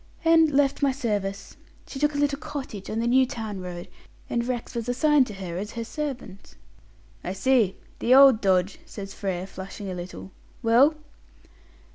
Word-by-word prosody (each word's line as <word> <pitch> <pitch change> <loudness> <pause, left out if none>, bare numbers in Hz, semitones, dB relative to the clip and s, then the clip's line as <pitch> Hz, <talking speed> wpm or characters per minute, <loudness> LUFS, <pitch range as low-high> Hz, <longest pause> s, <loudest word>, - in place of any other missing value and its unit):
"And 325 -1 +6
left 280 0 +1
my 280 -1 +3
service. 205 -7 -3 0.3
She 270 - -8
took 295 +1 +1
a - - -1
little 285 -1 +1
cottage 240 -11 -7
on 215 - -3
the 230 - 0
New 255 +2 +4
Town 220 -5 -5
road, 175 -1 -7 0.4
and 235 - 0
Rex 245 -2 -4
was 235 0 -4
assigned 280 +1 +3
to 210 - -8
her 180 -3 -5
as 210 +3 -6
her 230 - -4
servant." 245 -7 -6 0.7
"I 180 - -3
see. 215 -2 +2 0.2
The 250 +2 +4
old 270 -4 +7
dodge!" 190 -1 +1
says 195 -1 -8
Frere, 190 -3 -3
flushing 195 +1 -8
a - - -4
little. 180 +1 -8 0.3
"Well?" 250 +7 +5
230 Hz, 170 wpm, -25 LUFS, 195-270 Hz, 0.7 s, old